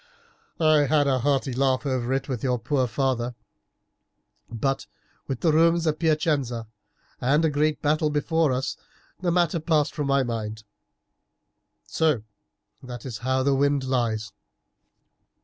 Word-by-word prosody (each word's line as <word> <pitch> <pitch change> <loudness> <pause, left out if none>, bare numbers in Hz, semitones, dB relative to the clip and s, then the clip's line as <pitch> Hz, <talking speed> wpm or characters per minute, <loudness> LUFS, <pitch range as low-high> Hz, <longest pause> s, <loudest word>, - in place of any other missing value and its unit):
I 155 -3 +4
had 145 +1 +3
a 135 -2 +2
hearty 135 0 0
laugh 130 +1 +1
over 130 -2 -1
it 135 - -1
with 130 -5 -3
your 125 -2 +1
poor 130 +2 0
father, 125 -1 -1 1.1
but 135 +4 -2 0.4
with 135 -3 -4
the 165 - +3
Romans 165 +2 +3
at 155 -1 0
Piacenza 150 -8 0 0.5
and 145 +6 +2
a 160 - +2
great 150 +1 0
battle 155 +1 +2
before 150 +1 +1
us 130 +1 -2 0.4
the 180 - -1
matter 170 -1 +2
passed 155 -2 +1
from 150 -3 -2
my 140 -1 +3
mind. 110 -3 -4 1.2
So 155 -9 +1 0.6
that 125 -1 -9
is 120 -5 -6
how 130 +2 0
the 140 +1 +2
wind 140 0 +2
lies. 115 -5 -1
135 Hz, 140 wpm, -25 LUFS, 125-155 Hz, 1.2 s, I